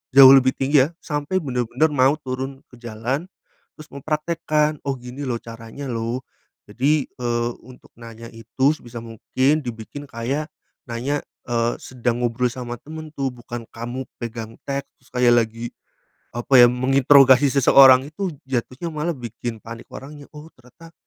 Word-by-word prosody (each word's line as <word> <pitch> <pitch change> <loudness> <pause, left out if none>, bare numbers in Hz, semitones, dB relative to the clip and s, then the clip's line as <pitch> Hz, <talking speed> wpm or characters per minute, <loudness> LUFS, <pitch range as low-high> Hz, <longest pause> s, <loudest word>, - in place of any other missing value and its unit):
jauh 135 -1 +11
lebih 130 -1 +5
tinggi 135 0 +4
ya, - - -12
sampe 150 +5 -2
bener-bener 125 +3 0
mau 135 +3 +4
turun 130 +1 -5
ke - - -14
jalan, 120 +6 -3 0.6
terus 155 - -11
mempraktikkan, 150 +1 -1
"Oh, 135 - 0
gini 125 +3 -8
loh, 120 -2 -2
caranya 115 +4 -9
loh." 115 +1 -3 0.5
Jadi, 140 +6 +1
eee, 120 -1 -2
untuk 130 0 -16
nanya 115 0 -10
itu 130 +6 +1
sebisa 120 -4 -10
mungkin 130 +6 0
dibikin 120 +5 -7
kayak, 135 +7 -3 0.4
nanya, 130 +5 -2 0.3
eee, 120 0 0
sedang 120 -2 -2
ngobrol 120 +1 +1
sama 120 -1 -6
temen 155 0 -9
tuh, 135 -1 -1
bukan 120 -1 -8
kamu 120 +3 -5 0.2
pegang 115 -1 -6
teks, 140 -2 -6
kayak 125 -1 +4
lagi, 115 +1 -7 0.7
apa 125 +2 +5
ya, 120 - +10
menginterogasi 135 +1 +5
seseorang, 135 -1 +7
itu 190 +5 -4 0.2
jatuhnya 130 +5 -3
malah 155 +3 -1
bikin 120 -1 -6
panik 115 0 -9
orangnya. 145 +1 -10
"Oh, 150 +2 -10
ternyata 165 +7 -17
130 Hz, 145 wpm, -22 LUFS, 120-145 Hz, 0.7 s, jauh